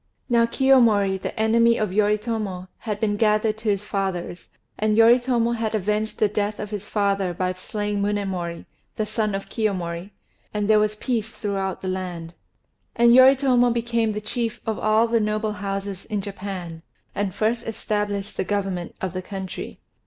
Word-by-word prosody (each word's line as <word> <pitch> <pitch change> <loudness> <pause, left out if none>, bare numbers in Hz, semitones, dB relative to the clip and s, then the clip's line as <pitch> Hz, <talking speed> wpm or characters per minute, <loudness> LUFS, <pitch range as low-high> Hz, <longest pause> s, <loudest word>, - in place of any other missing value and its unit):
Now 235 -1 +4
Kiyomori, 230 -8 +4
the - - -5
enemy 230 +1 +4
of 215 -3 -1
Yoritomo, 210 -3 0
had 210 -3 -4
been 210 -2 0
gathered 215 0 +2
to 220 -1 -2
his 200 0 0
fathers; 190 -4 -3 0.3
and 215 0 +2
Yoritomo 235 0 +4
had 225 -2 -1
avenged 210 +2 -1
the 215 - +3
death 205 0 -2
of 210 0 -5
his 205 -1 -5
father 200 -3 0
by 185 +1 -1
slaying 205 +2 -3
Munémori, 190 -4 -2 0.3
the 215 - -1
son 215 -2 -1
of 195 - -5
Kiyomori; 185 -5 -2 0.5
and 210 -1 0
there 215 0 +5
was 210 0 +1
peace 225 -1 -2
throughout 195 -4 -3
the - - -3
land. 180 -3 -4 0.6
And 235 0 +6
Yoritomo 260 -1 +6
became 230 -2 0
the 210 - -4
chief 230 +1 -3
of 220 -1 -2
all 215 +2 +3
the 230 0 +2
noble 215 0 -1
houses 195 -1 -4
in 210 -2 -2
Japan, 190 -4 -6 0.3
and 200 -3 -2
first 230 +2 0
established 205 -2 -2
the - - +1
government 190 -3 -2
of 190 -1 -3
the 185 - -3
country. 190 0 -6
210 Hz, 165 wpm, -23 LUFS, 195-225 Hz, 0.6 s, And